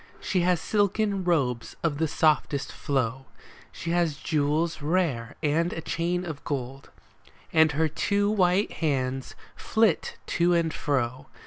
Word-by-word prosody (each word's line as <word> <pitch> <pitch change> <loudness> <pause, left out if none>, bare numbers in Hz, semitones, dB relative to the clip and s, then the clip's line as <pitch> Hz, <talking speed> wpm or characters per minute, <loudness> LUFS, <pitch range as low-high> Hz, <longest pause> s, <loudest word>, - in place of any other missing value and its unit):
She 190 -1 0
has 180 -1 +2
silken 205 +2 +1
robes 135 -9 0
of 155 -3 0
the 160 - +2
softest 150 -2 +1
flow, 130 -1 -2 0.4
She 165 - -5
has 170 -4 +1
jewels 155 +1 0
rare 145 -8 0
and 165 +4 +1
a 165 - -4
chain 175 +3 -1
of 155 -4 -6
gold, 135 -1 -5 0.6
And 160 -1 +5
her 160 +2 +2
two 200 +6 0
white 190 0 +2
hands 135 -4 -2 0.2
flit 220 -6 +1
to 175 0 +2
and 165 -2 +1
fro. 130 -1 -1
160 Hz, 135 wpm, -26 LUFS, 140-175 Hz, 0.6 s, And